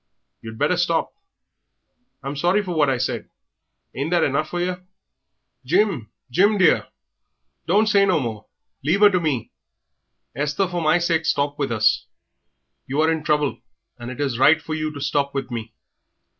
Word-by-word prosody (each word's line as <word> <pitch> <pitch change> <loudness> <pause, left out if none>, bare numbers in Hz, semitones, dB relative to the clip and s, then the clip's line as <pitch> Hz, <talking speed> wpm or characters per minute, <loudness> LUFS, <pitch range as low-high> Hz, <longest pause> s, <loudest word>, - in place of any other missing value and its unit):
You'd 110 0 -9
better 150 +7 +1
stop. 170 -2 0 1.1
I'm 135 +2 -4
sorry 175 +8 +2
for 180 -3 -4
what 150 -3 +2
I 130 - +1
said. 125 - -3 0.6
Ain't 140 +4 -3
that 175 -2 +2
enough 155 +2 0
for 175 - -3
yer?" 180 +1 -3 0.8
"Jim, 170 - +1 0.2
Jim, 205 - +3
dear, 185 -3 +3 0.8
don't 205 +6 +3
say 200 -2 +4
no 180 -4 +3
more; 110 -5 -5 0.4
leave 175 +9 +2
'er 205 - +8
to 180 - +2
me. 150 -8 -2 0.8
Esther, 150 +7 0
for 175 -1 -3
my 155 +1 +3
sake 165 -2 0
stop 145 +1 0
with 140 -3 -1
us. 110 -1 +2 0.8
You 135 +3 -2
are 160 +1 +3
in 160 -2 -2
trouble, 150 -2 0 0.4
and 120 0 -7
it 130 - -8
is 135 -5 -1
right 155 +4 +6
for 160 0 -6
you 155 0 -2
to 145 - -8
stop 140 0 -1
with 135 -2 -3
me. 115 -1 -5
155 Hz, 170 wpm, -22 LUFS, 135-175 Hz, 1.1 s, er